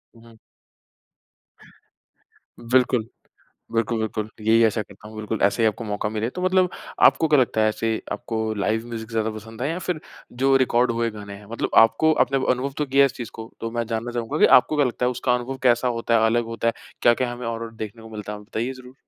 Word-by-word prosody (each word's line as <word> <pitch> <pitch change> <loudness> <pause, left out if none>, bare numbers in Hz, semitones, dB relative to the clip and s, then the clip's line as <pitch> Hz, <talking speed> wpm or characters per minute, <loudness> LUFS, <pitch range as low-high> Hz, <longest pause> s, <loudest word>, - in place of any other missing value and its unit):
हुँ। 115 0 -17 2.2
बिल्कुल। 125 -1 +2 0.7
बिल्कुल, 115 0 0
बिल्कुल 110 -1 -3
यही 115 +2 +4
आशा 110 0 +1
करता 105 - -14
हूँ 110 - -12
बिल्कुल 110 -1 -4
ऐसे 100 +4 +2
ही - - +5
आपको 110 +1 -1
मौका 105 0 -2
मिले। 110 +1 -2
तो 180 - -6
मतलब 185 0 +3 0.3
आपको 160 - +5
क्या 150 -1 +4
लगता 115 -3 +1
है 110 - +4
ऐसे 110 +1 -1
आपको 115 - -4 0.2
लाइव 110 +3 -1
म्यूज़िक 115 -1 -7
ज़्यादा 110 -1 0
पसंद 110 +2 -9
है 135 - 0
या 165 - -3
फ़िर 180 -3 -3 0.4
जो 135 0 +4
रिकॉर्ड 125 -1 +2
हुए 115 0 0
गाने 105 -2 -9
हैं? 100 +1 -14
मतलब 115 - -2
आपको 115 +9 +2
आपने 135 -2 +2
अनुभव 130 +2 0
तो 150 - 0
किया 135 +1 +4
है - - +6
इस 135 - -4
चीज़ 120 - -6
को 110 0 -9
तो 115 - -3
मैं 120 0 -2
जानना 115 +1 -3
चाहूँगा 120 -2 -3
कि - - +7
आपको 130 +5 -2
क्या 145 -2 +3
लगता 125 0 -1
है - - +2
उसका 125 0 0
अनुभव 125 +2 -3
कैसा 125 0 +3
होता 115 -1 -1
है, 110 - +4
अलग 120 +1 +2
होता 115 0 -2
है? - - +2 0.3
क्या-क्या 120 +1 +3
हमें 120 0 -6
और-और 115 0 -4
देखने 110 +1 -7
को 110 - -11
मिलता 105 -1 -7
है? 105 - -6
बताइए 115 +4 -4
ज़रूर। 130 0 -13
115 Hz, 220 wpm, -23 LUFS, 110-125 Hz, 2.2 s, कि